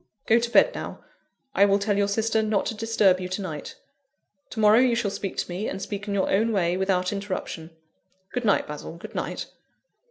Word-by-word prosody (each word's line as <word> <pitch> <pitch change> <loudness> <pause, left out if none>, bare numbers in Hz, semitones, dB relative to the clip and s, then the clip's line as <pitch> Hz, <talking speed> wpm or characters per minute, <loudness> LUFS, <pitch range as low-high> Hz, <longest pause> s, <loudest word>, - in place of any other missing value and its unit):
Go 225 +1 +5
to 235 0 -2
bed - - +5
now; - - -7 0.5
I 200 - +5
will 200 0 +4
tell 205 0 0
your 200 0 +2
sister 220 +2 +1
not 215 -2 0
to 225 - -2
disturb 210 -4 +3
you 180 0 -5
to 185 +2 -3
night. 155 -5 -6 0.7
To 220 - -6
morrow, 215 +1 +6
you 250 -2 +4
shall 225 -4 0
speak 195 -1 -5
to - - -1
me; 185 +5 -3
and 195 - -5
speak 200 +1 -5
in 200 - -1
your 195 - +1
own 220 +4 +2
way, 180 -4 +1
without 185 0 0
interruption. 185 -5 -5 0.6
Good 250 - -2
night, 205 -3 +2
Basil, 150 +2 -7
good - - -10
night." - - -3
200 Hz, 210 wpm, -25 LUFS, 185-220 Hz, 0.7 s, morrow